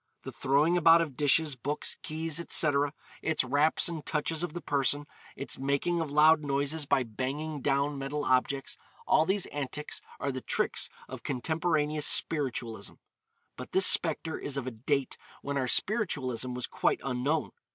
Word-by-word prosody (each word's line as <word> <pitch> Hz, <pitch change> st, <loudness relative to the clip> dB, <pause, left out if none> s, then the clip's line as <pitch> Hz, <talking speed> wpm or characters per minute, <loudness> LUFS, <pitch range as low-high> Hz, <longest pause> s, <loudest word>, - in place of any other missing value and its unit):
The -, -, -6 dB
throwing 150 Hz, +6 st, +2 dB
about 165 Hz, 0 st, +6 dB
of 150 Hz, -6 st, -3 dB
dishes, 145 Hz, +1 st, +3 dB
books, 145 Hz, +4 st, -2 dB
keys, 160 Hz, 0 st, -2 dB
etc.; 145 Hz, -4 st, +3 dB, 0.3 s
its 160 Hz, -3 st, +1 dB
raps 145 Hz, +8 st, +2 dB
and 165 Hz, -3 st, -4 dB
touches 155 Hz, +1 st, -1 dB
of 175 Hz, -3 st, -3 dB
the 175 Hz, -, -4 dB
person; 145 Hz, 0 st, 0 dB, 0.3 s
its 140 Hz, -, -5 dB
making 140 Hz, +6 st, 0 dB
of 160 Hz, -, -3 dB
loud 150 Hz, +2 st, +5 dB
noises 140 Hz, +2 st, -1 dB
by 130 Hz, -, +3 dB
banging 135 Hz, +6 st, -4 dB
down 140 Hz, +1 st, 0 dB
metal 145 Hz, +2 st, -3 dB
objects; 130 Hz, +1 st, 0 dB, 0.3 s
all 155 Hz, -, +3 dB
these 195 Hz, 0 st, +1 dB
antics 145 Hz, +1 st, -4 dB, 0.2 s
are 140 Hz, -, -1 dB
the 130 Hz, -1 st, -5 dB
tricks -, -, -1 dB, 0.2 s
of -, -, -8 dB
contemporaneous 150 Hz, +2 st, 0 dB
spiritualism. 130 Hz, -7 st, +1 dB, 0.6 s
But 125 Hz, -, -10 dB
this 190 Hz, 0 st, +4 dB
spectre 160 Hz, -1 st, +2 dB
is 140 Hz, -1 st, -4 dB
of 135 Hz, -, -3 dB
a 130 Hz, -, -4 dB
date 135 Hz, +4 st, -2 dB, 0.2 s
when 140 Hz, 0 st, -3 dB
our 130 Hz, -2 st, 0 dB
spiritualism 130 Hz, -, 0 dB
was 125 Hz, -, -2 dB
quite -, -, 0 dB
unknown. 135 Hz, +4 st, -1 dB
145 Hz, 160 wpm, -29 LUFS, 135-160 Hz, 0.6 s, about